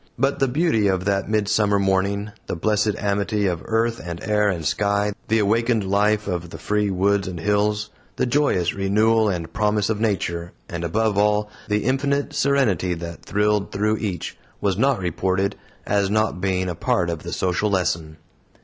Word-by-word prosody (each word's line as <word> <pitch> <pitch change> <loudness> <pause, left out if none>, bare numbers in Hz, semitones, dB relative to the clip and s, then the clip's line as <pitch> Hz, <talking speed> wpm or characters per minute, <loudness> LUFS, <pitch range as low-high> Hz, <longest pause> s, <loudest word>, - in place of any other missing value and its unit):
But 135 +3 +1
the 135 - +3
beauty 130 -6 +2
of 95 -1 0
that 100 0 0
midsummer 105 -1 +2
morning, 100 +2 0 0.2
the - - -2
blessed 105 +4 +1
amity 100 0 0
of 90 -3 -1
earth 115 +1 0
and 85 -1 -6
air 105 -1 +2
and 85 -5 -3
sky, 100 +3 +1 0.2
the 110 - +2
awakened 110 +1 +2
life 105 +2 +2
of 90 -3 -3
the - - -8
free 105 -1 0
woods 100 +1 +1
and 90 -2 -5
hills, 105 +3 0 0.2
the - - 0
joyous 120 - +1
renewal 110 +3 +2
and 85 -4 -4
promise 105 0 +1
of 110 -1 -2
Nature, 85 -6 -1
and 85 0 -5
above 105 +4 +1
all, 105 0 +2 0.2
the 105 0 0
infinite 140 +3 0
Serenity 110 - +1
that 85 0 -8
thrilled 105 0 0
through 105 +2 +1
each, 95 -7 -4 0.2
was 100 -2 +1
not 135 +5 +2
reported, 95 +2 -1 0.3
as 100 -1 +1
not 110 -3 0
being 95 -1 0
a 90 - -2
part 85 +1 0
of 80 -2 -5
the - - -7
social 95 +3 0
lesson. 85 -5 -1
105 Hz, 175 wpm, -22 LUFS, 95-110 Hz, 0.3 s, the